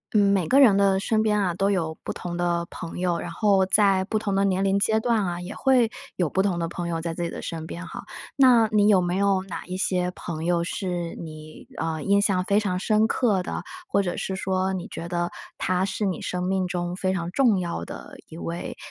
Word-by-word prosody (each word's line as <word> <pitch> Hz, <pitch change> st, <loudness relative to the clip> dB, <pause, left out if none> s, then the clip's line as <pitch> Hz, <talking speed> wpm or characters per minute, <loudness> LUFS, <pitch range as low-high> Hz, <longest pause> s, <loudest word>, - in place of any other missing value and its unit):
嗯， 200 Hz, -1 st, +5 dB
每 185 Hz, -5 st, +1 dB
个 275 Hz, -, +5 dB
人 230 Hz, -8 st, +7 dB
的 195 Hz, -1 st, +3 dB
身 215 Hz, +2 st, +1 dB
边 210 Hz, -1 st, +2 dB
啊， 185 Hz, -4 st, +1 dB
都 195 Hz, +3 st, +1 dB
有 165 Hz, -5 st, -1 dB
不 -, -, -4 dB
同 175 Hz, -1 st, -5 dB
的 175 Hz, -1 st, 0 dB
朋 165 Hz, -2 st, -7 dB
友， 175 Hz, -1 st, 0 dB
然 -, -, -5 dB
后 200 Hz, -3 st, +3 dB
在 195 Hz, -1 st, +4 dB
不 215 Hz, -, -1 dB
同 210 Hz, -2 st, -2 dB
的 195 Hz, 0 st, +2 dB
年 190 Hz, -1 st, +1 dB
龄 195 Hz, 0 st, +2 dB
阶 220 Hz, +2 st, +2 dB
段 225 Hz, -2 st, +1 dB
啊， 175 Hz, -2 st, -2 dB
也 180 Hz, +3 st, -7 dB
会 250 Hz, -4 st, +3 dB, 0.2 s
有 175 Hz, -, +1 dB
不 190 Hz, -, +1 dB
同 190 Hz, -3 st, 0 dB
的 170 Hz, -1 st, -1 dB
朋 175 Hz, +1 st, -5 dB
友 165 Hz, -1 st, -2 dB
在 165 Hz, 0 st, -3 dB
自 170 Hz, -, -6 dB
己 170 Hz, -, -1 dB
的 -, -, -7 dB
身 160 Hz, -1 st, -5 dB
边 170 Hz, +2 st, -7 dB
哈。 -, -, -8 dB, 0.3 s
那 250 Hz, -5 st, +6 dB
你 210 Hz, -1 st, +4 dB
有 200 Hz, -3 st, +5 dB
没 175 Hz, 0 st, -1 dB
有 195 Hz, -1 st, +2 dB
哪 190 Hz, -3 st, -7 dB
一 185 Hz, 0 st, -4 dB
些 180 Hz, -1 st, 0 dB
朋 165 Hz, -2 st, -5 dB
友 175 Hz, -1 st, +2 dB
是 175 Hz, -1 st, -3 dB
你， 155 Hz, -1 st, -10 dB
呃， 160 Hz, -1 st, -2 dB
印 200 Hz, +5 st, +3 dB
象 190 Hz, -3 st, +2 dB
非 200 Hz, +2 st, +2 dB
常 185 Hz, -4 st, -1 dB
深 215 Hz, +2 st, +3 dB
刻 220 Hz, -5 st, +1 dB
的， -, -, -4 dB, 0.3 s
或 200 Hz, -, +2 dB
者 180 Hz, -3 st, -3 dB
是 190 Hz, -, -3 dB
说 190 Hz, 0 st, -1 dB
你 185 Hz, -2 st, -4 dB
觉 170 Hz, -, -7 dB
得 175 Hz, 0 st, -1 dB, 0.3 s
他 185 Hz, +1 st, +1 dB
是 205 Hz, +1 st, -2 dB
你 185 Hz, -, -3 dB
生 180 Hz, 0 st, -3 dB
命 190 Hz, 0 st, 0 dB
中 175 Hz, 0 st, -3 dB
非 185 Hz, 0 st, -1 dB
常 170 Hz, -2 st, -3 dB
重 230 Hz, -4 st, +3 dB
要 175 Hz, -1 st, -3 dB
的 -, -, -9 dB
一 160 Hz, -, -10 dB
位， 170 Hz, +1 st, -5 dB
185 Hz, 255 characters per minute, -25 LUFS, 175-200 Hz, 0.3 s, 人